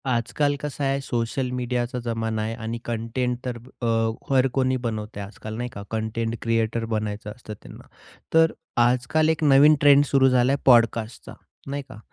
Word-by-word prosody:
आजकाल 125 +4 0
कसं 145 0 -5
आहे, 135 0 +1
सोशल 125 +1 -2
मीडियाचा 125 0 -2
जमाना 115 -1 -2
आहे 110 +1 -2
आणि 115 0 -5
कंटेंट 120 +2 -2
तर 125 -2 -3 0.2
अ, - - -2 0.5
हर 130 0 +4
कोणी 130 -1 +1
बनवतय 105 -2 -4
आजकाल, 110 +2 -8
नाही 125 +1 -3
का 100 - -7
कंटेंट 115 +1 -2
क्रिएटर 115 0 0
बनायचं 105 -1 -3
असतं 110 -1 -10
त्यांना, - - -13 0.5
तर 160 0 +5 0.3
आजकाल 125 +6 +2
एक 160 -1 0
नवीन 145 +1 +6
ट्रेंड 145 -1 +7
सुरू 135 -2 +4
झाला 125 0 +3
आहे 140 - -1
पॉडकास्टचा 115 -2 +2 0.4
नाही 140 0 -3
का. 110 - -11
120 Hz, 165 wpm, -24 LUFS, 115-135 Hz, 0.5 s, ट्रेंड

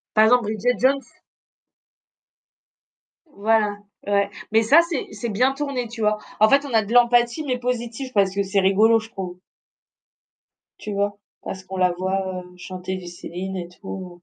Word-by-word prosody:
Par 215 0 +7
exemple, 245 0 +4
Bridget 220 +2 0
Jones? 270 +2 +2 2.3
Voilà, 210 0 +2 0.3
ouais. 200 0 +1 0.2
Mais 225 +1 +5
ça, 285 +9 +6
c'est 320 -6 -3
c'est 235 - -4
bien 250 +6 +2
tourné, 270 -4 -3
tu 230 0 -9
vois? 210 0 +2 0.2
En 215 - +7
fait, 280 +3 +4
on 280 - -6
a 220 - +5
de 215 +3 -6
l'empathie 240 +4 +4
mais 250 -2 -1
positive 245 +1 -3
parce 195 -2 +3
que 200 - +1
c'est 195 0 +1
rigolo, 215 +4 +4
je 225 +1 -12
trouve. 185 -4 -6 1.4
Tu 210 - -6
vois? 200 0 -1 0.2
Parce 190 0 -7
qu'on 190 0 -7
la 185 -1 +3
voit, 185 0 -2
heu, 180 0 -16
chanter 185 +1 -6
du 185 -1 -9
Céline 180 +2 -6
et 175 -1 -5
tout. 180 -1 -9
210 Hz, 170 wpm, -23 LUFS, 190-240 Hz, 2.3 s, Par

